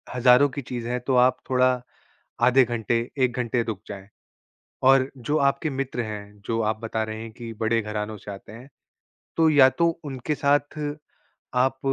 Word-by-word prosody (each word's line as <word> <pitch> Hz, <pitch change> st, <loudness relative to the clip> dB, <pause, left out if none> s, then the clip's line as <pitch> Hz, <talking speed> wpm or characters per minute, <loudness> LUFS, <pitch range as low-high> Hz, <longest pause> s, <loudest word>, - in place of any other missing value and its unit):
हज़ारों 125 Hz, +3 st, +5 dB
की 140 Hz, +2 st, -5 dB
चीज़ 120 Hz, -2 st, -6 dB
है 125 Hz, +1 st, -1 dB
तो 130 Hz, -, +2 dB
आप 125 Hz, +1 st, +4 dB
थोड़ा 130 Hz, 0 st, +4 dB, 0.7 s
आधे 130 Hz, +1 st, +6 dB
घंटे, 120 Hz, 0 st, -1 dB
1 125 Hz, -2 st, +1 dB
घंटे 120 Hz, -1 st, 0 dB
रुक 110 Hz, -4 st, -5 dB
जाएँ। 100 Hz, -1 st, -9 dB, 0.8 s
और 135 Hz, 0 st, +5 dB
जो 145 Hz, +5 st, -1 dB
आपके 140 Hz, +2 st, +1 dB
मित्र 135 Hz, -3 st, -3 dB
हैं, 105 Hz, -2 st, -8 dB
जो 115 Hz, 0 st, -1 dB
आप 110 Hz, 0 st, -1 dB
बता 110 Hz, -1 st, -2 dB
रहे 110 Hz, 0 st, -6 dB
हैं 115 Hz, -1 st, -8 dB
कि 115 Hz, 0 st, -8 dB
बड़े 115 Hz, 0 st, +1 dB
घरानों 105 Hz, 0 st, -4 dB
से 100 Hz, -, -9 dB
आते 100 Hz, +1 st, -11 dB
हैं, 120 Hz, +5 st, -12 dB, 0.7 s
तो 165 Hz, -1 st, +4 dB
या 140 Hz, -3 st, +7 dB
तो 170 Hz, +5 st, +1 dB, 0.2 s
उनके 140 Hz, +1 st, -3 dB
साथ 145 Hz, +1 st, +1 dB, 0.8 s
आप 130 Hz, +1 st, +2 dB
125 Hz, 175 wpm, -24 LUFS, 110-135 Hz, 0.8 s, या